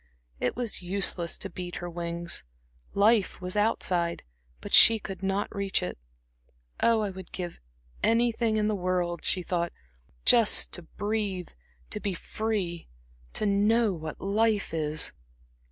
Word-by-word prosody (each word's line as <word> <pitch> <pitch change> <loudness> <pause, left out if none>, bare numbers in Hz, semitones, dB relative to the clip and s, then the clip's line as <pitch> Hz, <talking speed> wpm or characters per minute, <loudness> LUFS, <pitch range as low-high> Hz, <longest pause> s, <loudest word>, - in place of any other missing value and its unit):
It 125 - -1
was 235 -5 -2
useless 180 -2 +1
to - - -2
beat 175 -1 -7
her 175 - -5
wings; 170 - -3 0.5
life 210 0 +3
was 180 +1 -4
outside, 180 -5 +1 0.4
but - - -9
she 225 - +9
could 195 -2 -8
not 195 +2 -2
reach 200 -1 0
it. 90 - -4 0.8
"Oh, 230 -1 +3
I 205 -2 -2
would 190 -1 -10
give 175 -2 -6 0.4
anything 230 -1 +2
in 210 -1 +1
the 215 - +1
world," 180 -3 -1
she 185 - 0
thought 170 0 -1 0.5
"just 230 -3 +6
to 175 - -2
breathe, 205 0 -3 0.4
to - - 0
be 195 -3 -2
free, 195 -4 -3 0.5
to - - -1
know 210 +2 +3
what 160 -2 -7
life 210 -1 +1
is." 155 -1 +1
195 Hz, 140 wpm, -28 LUFS, 175-215 Hz, 0.8 s, she